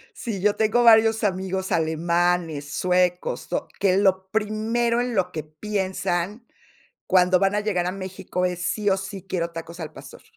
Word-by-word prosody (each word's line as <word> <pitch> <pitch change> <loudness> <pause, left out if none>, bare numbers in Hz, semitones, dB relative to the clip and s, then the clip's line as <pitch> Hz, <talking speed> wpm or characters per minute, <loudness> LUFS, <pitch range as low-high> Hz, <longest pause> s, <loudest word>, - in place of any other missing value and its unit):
Sí, 220 -6 -4
yo 205 +2 +2
tengo 220 +2 +2
varios 225 -1 +6
amigos 190 -1 -1
alemanes, 165 -2 0
suecos, 180 -1 0
o - - -2
que 190 -2 +3
lo 190 -1 +2
primero 220 +3 0
en 245 -1 -2
lo 185 -3 +1
que 155 - -4
piensan, 190 +4 -3 0.6
cuando 180 0 +4
van 195 +2 +2
a 210 - +1
llegar 190 -4 -1
a 180 - -1
México, 185 -1 -3
es: 180 -1 -3
"Sí 205 +4 -1
o 190 - +3
sí 195 0 -7
quiero 170 -3 -2
tacos 170 +1 -8
al 155 -1 -6
pastor". 135 -2 -12
190 Hz, 170 wpm, -24 LUFS, 175-210 Hz, 0.6 s, varios